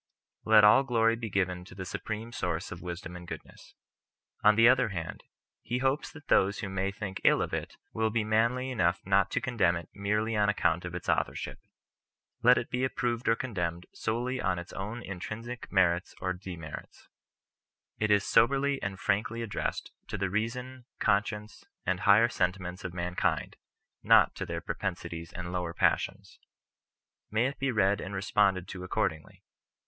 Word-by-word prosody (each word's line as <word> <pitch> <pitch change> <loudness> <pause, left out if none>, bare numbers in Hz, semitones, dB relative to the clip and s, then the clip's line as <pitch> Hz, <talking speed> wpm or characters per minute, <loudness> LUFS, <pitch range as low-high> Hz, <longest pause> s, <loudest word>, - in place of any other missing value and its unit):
Let 110 -1 +7
all 105 +5 +8
glory 115 -4 +2
be 115 -1 -5
given 90 -2 0
to 90 - -13
the 95 0 -6
Supreme 110 +5 -5
Source 90 -6 -3
of 85 - -7
wisdom 90 -1 -6
and 90 -1 -9
goodness. - - -10 0.7
On 105 0 +7
the 115 +1 +7
other 125 -2 +4
hand, 85 -5 -5 0.4
he 120 - -2
hopes 135 +3 0
that 150 -4 -14
those 100 +2 +3
who 100 - -4
may 95 0 -1
think 100 -2 -6
ill - - +5
of - - -2
it - - -4 0.2
will 110 0 +1
be 110 0 0
manly 115 +4 +1
enough 85 -7 +1
not 100 0 +3
to - - 0
condemn 100 -9 +2
it 85 -1 -6
merely 105 +3 0
on 105 -1 +3
account 90 -4 +1
of 90 -1 -5
its 90 - -6
authorship. - - -1 0.8
Let 125 +1 +6
it 120 - -3
be 125 +1 0
approved 120 -2 -1
or 115 - +5
condemned 90 -9 -3
solely 120 +3 -2
on 95 -1 0
its 85 +1 -8
own 105 +5 -5
in 95 -2 -6
trinsic 115 +6 -6
merits 90 -2 +2
or 95 -1 -1
demerits. 90 -5 -9 0.9
It 105 - +1
is 100 -1 +4
soberly 135 +4 +3
and 95 -1 -4
frankly 105 +4 0
addressed 110 - -3 0.2
to - - -4
the 95 -1 -1
reason, 125 +4 -3
conscience, 105 0 0 0.2
and 95 0 0
higher 105 +4 +6
sentiments 90 -3 -2
of 90 - -4
mankind 90 0 -1 0.3
— - - -57
not - - +6
to - - -4
their - - -3
propensities 85 0 -4
and 85 -1 -6
lower 90 -2 -3
passions. - - 0 0.9
May 110 +3 +2
it 140 +2 -3
be 135 - 0
read 100 -3 +2
and 100 - -5
responded 95 -1 +2
to 90 -1 -6
accordingly. 80 -3 -2
105 Hz, 175 wpm, -29 LUFS, 90-115 Hz, 0.9 s, all